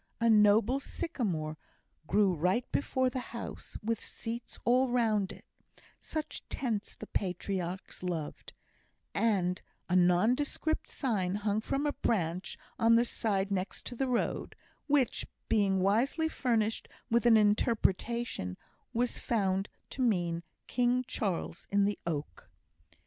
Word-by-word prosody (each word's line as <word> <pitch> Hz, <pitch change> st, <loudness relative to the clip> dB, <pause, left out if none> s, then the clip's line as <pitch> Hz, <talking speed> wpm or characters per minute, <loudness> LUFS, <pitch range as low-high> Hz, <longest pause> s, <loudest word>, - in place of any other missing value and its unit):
A 230 Hz, 0 st, +4 dB
noble 215 Hz, +4 st, +5 dB
sycamore 175 Hz, -, -3 dB, 0.5 s
grew 195 Hz, +2 st, +4 dB
right 180 Hz, +9 st, +1 dB
before 260 Hz, -2 st, +1 dB
the 255 Hz, -, -2 dB, 0.2 s
house, -, -, -7 dB
with 225 Hz, 0 st, -1 dB
seats 230 Hz, +1 st, -6 dB
all 255 Hz, +2 st, +4 dB
round 220 Hz, -5 st, +2 dB
it -, -, -12 dB, 0.5 s
("such 310 Hz, -1 st, -4 dB
tents 225 Hz, -6 st, -2 dB
the -, -, -7 dB
patriarchs 185 Hz, -1 st, -3 dB
loved"); 170 Hz, -5 st, -4 dB, 0.6 s
and 185 Hz, -5 st, +1 dB, 0.3 s
a 180 Hz, -, +1 dB
nondescript 225 Hz, -, +2 dB
sign 200 Hz, -9 st, 0 dB
hung 210 Hz, +1 st, 0 dB
from 275 Hz, +6 st, -1 dB
a 295 Hz, -, +1 dB
branch 180 Hz, -4 st, -1 dB, 0.2 s
on 230 Hz, -1 st, +6 dB
the 235 Hz, +1 st, +4 dB
side 200 Hz, -4 st, 0 dB
next 190 Hz, 0 st, -2 dB
to 245 Hz, -, -5 dB
the 265 Hz, +2 st, 0 dB
road, 245 Hz, -2 st, -1 dB, 0.3 s
which, 280 Hz, -5 st, +2 dB, 0.2 s
being 195 Hz, -3 st, +3 dB
wisely 240 Hz, -, +2 dB
furnished 225 Hz, -7 st, 0 dB, 0.2 s
with 235 Hz, +1 st, +4 dB
an 225 Hz, -2 st, +8 dB
interpretation, 210 Hz, -, +1 dB, 0.4 s
was 245 Hz, +1 st, 0 dB
found 195 Hz, -3 st, 0 dB, 0.2 s
to 265 Hz, -, -4 dB
mean 175 Hz, -8 st, +1 dB, 0.2 s
King 250 Hz, +1 st, +1 dB
Charles 185 Hz, -5 st, -3 dB
in 200 Hz, 0 st, +3 dB
the 205 Hz, 0 st, -1 dB
oak. 150 Hz, -3 st, -4 dB
215 Hz, 125 wpm, -31 LUFS, 190-240 Hz, 0.6 s, an